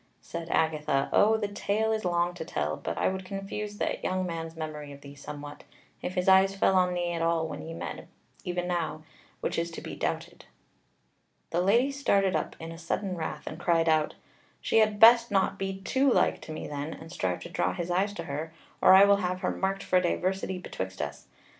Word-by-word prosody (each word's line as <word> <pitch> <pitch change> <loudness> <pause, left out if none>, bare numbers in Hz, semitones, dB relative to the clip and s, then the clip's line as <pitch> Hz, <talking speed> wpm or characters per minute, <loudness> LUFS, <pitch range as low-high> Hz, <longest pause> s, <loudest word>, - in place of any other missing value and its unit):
Said 170 0 -6
Agatha: 150 -4 +1
"O, 220 +2 +5
the 210 -2 -1
tale 205 +2 0
is 220 -1 -1
long 175 -1 +1
to 175 - -6
tell; 75 - -2
but - - -5
I - - +2
would 190 0 -2
confuse 200 +2 -5
that - - -2
young 185 0 0
man's 165 -2 -5
memory 155 -2 -6
of 140 0 -11
thee 140 0 -11
somewhat, 145 +1 -9 0.4
if 180 - -4
his 180 0 0
eyes 190 +1 +6
fell 195 - +3
on 180 -1 +3
thee 175 -1 -1
at 170 -1 -2
all 165 -1 +1
when 150 -1 -6
ye 165 +1 -7
met - - -6 0.4
e'en 180 -2 -2
now, 170 -3 -2 0.4
which - - -1
is 170 0 -1
to 165 - -7
be - - -7
doubted." - - -4 1.1
The 175 - +1
Lady 235 +9 +3
started 200 -10 +2
up 155 - -2
in 165 0 -7
sudden 185 +3 -2
wrath, 160 -2 -5
and 155 - -6
cried 165 -2 +2
out: 155 -1 +2 0.4
"She - - +2
had 215 -1 +2
best 235 +1 +8
not 195 -1 +1
be 195 0 -3
too 265 +7 +2
like - - +2
to - - -9
me 155 - -5
then, 145 +2 -4
and 165 +1 -11
strive 90 - -2
to - - -8
draw - - 0
his 175 0 -3
eyes 190 +3 +1
to 170 - -5
her, 155 +2 -5 0.3
or - - +8
I 195 +1 +9
will 200 0 +5
have 185 -1 -2
her - - 0
marked 195 +1 -2
for 185 - +3
diversity 185 +1 -1
betwixt 95 - -6
us. 75 -1 -5
180 Hz, 210 wpm, -28 LUFS, 160-195 Hz, 1.1 s, I